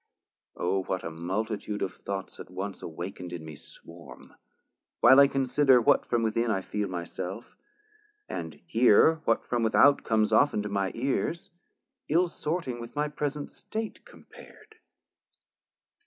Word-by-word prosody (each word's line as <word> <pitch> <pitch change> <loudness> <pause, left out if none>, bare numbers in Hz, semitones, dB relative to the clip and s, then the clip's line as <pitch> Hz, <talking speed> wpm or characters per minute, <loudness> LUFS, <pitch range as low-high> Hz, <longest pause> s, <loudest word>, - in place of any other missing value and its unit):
O 95 +2 0
what 95 0 -3
a 85 - -5
multitude 105 +5 -3
of 95 - -3
thoughts 100 -1 -6
at - - -9
once 95 +2 -6
Awakn'd 90 +2 -7
in 80 -2 -7
me 80 -1 -9
swarm, 85 +3 -14 0.7
while 130 - +7
I 140 - +8
consider 135 -1 +3
What 115 - +3
from 120 -1 +1
within 115 +1 0
I 95 -3 0
feel 105 +1 -3
my 90 -2 -4
self 95 +6 -7 0.7
and - - -6
hear 160 0 +4
What - - +1
from 120 -1 -1
without 125 +5 +4
comes 110 -1 +1
often 140 -7 +3
to 105 - -4
my 100 -1 -1
ears, 135 +7 -2 0.6
Ill 175 +3 +3
sorting 155 -7 -3
with 115 +3 -10
my 150 0 0
present 150 -1 -4
state 220 0 -6
compar'd. 435 0 -16
110 Hz, 145 wpm, -28 LUFS, 95-140 Hz, 0.7 s, I